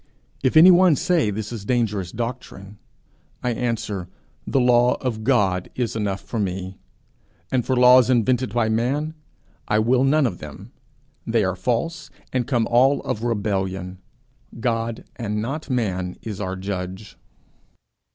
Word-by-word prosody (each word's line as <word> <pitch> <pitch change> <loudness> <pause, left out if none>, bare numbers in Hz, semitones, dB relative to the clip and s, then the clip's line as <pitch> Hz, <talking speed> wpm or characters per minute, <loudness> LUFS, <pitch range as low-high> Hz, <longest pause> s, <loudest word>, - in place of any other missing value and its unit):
If 130 +4 +2
any 175 +4 +9
one 180 -2 +5
say 170 - +1
this 105 +1 -4
is 115 -4 -6
dangerous 105 -6 -1
doctrine, 110 -4 -6 0.6
I 125 - 0
answer, 115 -6 -3 0.4
'The 135 - +1
law 125 0 +4
of 115 -4 -4
God 100 -8 +1
is 120 -3 -2
enough 100 -3 -2
for 115 - -5
me, 95 -1 -4 0.7
and 130 -2 +1
for 130 - 0
laws 125 0 +6
invented 125 -1 +2
by 120 0 +1
man, 130 +8 -1 0.5
I 105 - +2
will 125 +4 +3
none 145 +2 +3
of 90 -8 -2
them. 75 -1 -10 0.6
They 115 -1 +2
are 95 -1 -1
false, 125 - -2 0.2
and 125 -2 0
come 120 -5 +1
all 130 +5 +3
of 110 - -3
rebellion. 95 -5 -2 0.6
God 115 -1 -2
and 105 -3 -3
not 140 +9 -4
man 95 -8 -1
is 105 -3 -5
our 95 -1 -3
judge.' 95 +1 -6
115 Hz, 145 wpm, -22 LUFS, 100-125 Hz, 0.7 s, any